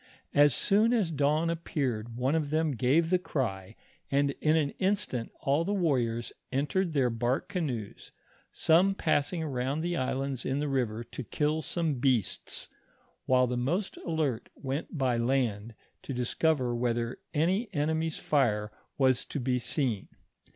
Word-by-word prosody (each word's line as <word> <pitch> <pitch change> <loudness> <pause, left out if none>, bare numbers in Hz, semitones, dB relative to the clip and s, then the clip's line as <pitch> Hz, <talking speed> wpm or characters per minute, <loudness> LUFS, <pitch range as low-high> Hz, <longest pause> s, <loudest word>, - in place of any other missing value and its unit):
As 145 -2 +5
soon 215 +4 +3
as 205 -8 +1
dawn 155 +3 +2
appeared 125 -9 -3
one 130 +3 +1
of 155 -3 0
them 155 0 +1
gave 140 +7 +2
the 185 - +4
cry, 110 - -3 0.3
and 140 0 +2
in 155 +1 +4
an 145 -3 +1
instant 185 - 0
all 140 +4 +2
the 200 +4 -1
wamors 120 - 0 0.2
entered 155 +6 0
their 130 -4 +2
bark 120 +3 -1
canoes, 135 - -4 0.4
some 185 +5 +4
passing 160 0 0
around 135 0 -1
the 175 +1 -1
islands 135 -2 -2
in 135 - -1
the 150 +1 -1
river 120 -5 -1
to 125 +2 -7
kill 150 +5 0
some 160 -5 -1
beasts, 125 -7 0 0.6
while 130 0 +5
the 125 0 -2
most 170 +11 -1
alert 155 -8 -2
went 140 +4 -4
by 130 -3 +1
land, 115 -3 0 0.3
to 135 - -5
discover 125 +1 +1
whether 120 0 -1 0.2
any 190 +9 +1
enemy's 160 0 0
fire 105 -8 +1 0.3
was 130 -2 +3
to - - -4
be 125 0 0
seen. 120 -4 -1
140 Hz, 150 wpm, -29 LUFS, 125-160 Hz, 0.6 s, As